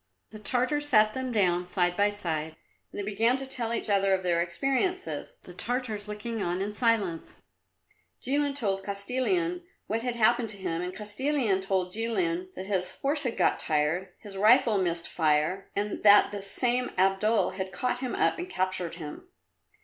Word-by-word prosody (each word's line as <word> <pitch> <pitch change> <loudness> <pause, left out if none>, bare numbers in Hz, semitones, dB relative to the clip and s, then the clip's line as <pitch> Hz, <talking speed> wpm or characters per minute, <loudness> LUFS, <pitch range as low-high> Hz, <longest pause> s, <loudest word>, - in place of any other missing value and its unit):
The 215 - -9
Tartars 255 +7 0
sat 215 -3 +5
them 260 -1 -3
down 180 -5 +2
side 180 -1 +1
by 205 +1 +3
side, 160 -6 -3 0.4
and - - -7
they 200 - -3
began 225 +5 +2
to 270 - -5
tell 245 -4 -3
each 235 - -1
other 195 -2 +3
of 190 - -5
their 170 -2 +2
experiences, 285 - -2
the - - -11
Tartars 230 -5 -3
looking 210 +2 -4
on 175 -1 -1
in 200 +2 -3
silence. 210 -8 0 0.8
Jilin 285 +2 0
told 195 -7 -1
Kostilin 260 - -1 0.2
what 225 +2 -2
had 245 0 -2
happened 235 0 +3
to 200 - -6
him, 175 -3 -3
and 180 0 -3
Kostilin 215 0 0
told 190 -2 -1
Jilin 335 - -1
that 190 - -6
his 190 -2 -1
horse 285 +2 0
had 245 -3 -3
got - - +2
tired, 160 +4 0
his 205 -3 -11
rifle 220 0 +5
missed 170 -2 -1
fire, 155 +4 +1
and 205 +1 -2
that 205 -1 +7
this 200 -1 -4
same 250 +3 +1
Abdul 195 +1 +2
had 190 0 -5
caught 245 +5 -2
him 255 -2 -3
up - - +1
and 355 +2 -5
captured 185 - -2
him. 160 - -8
210 Hz, 175 wpm, -28 LUFS, 185-250 Hz, 0.8 s, that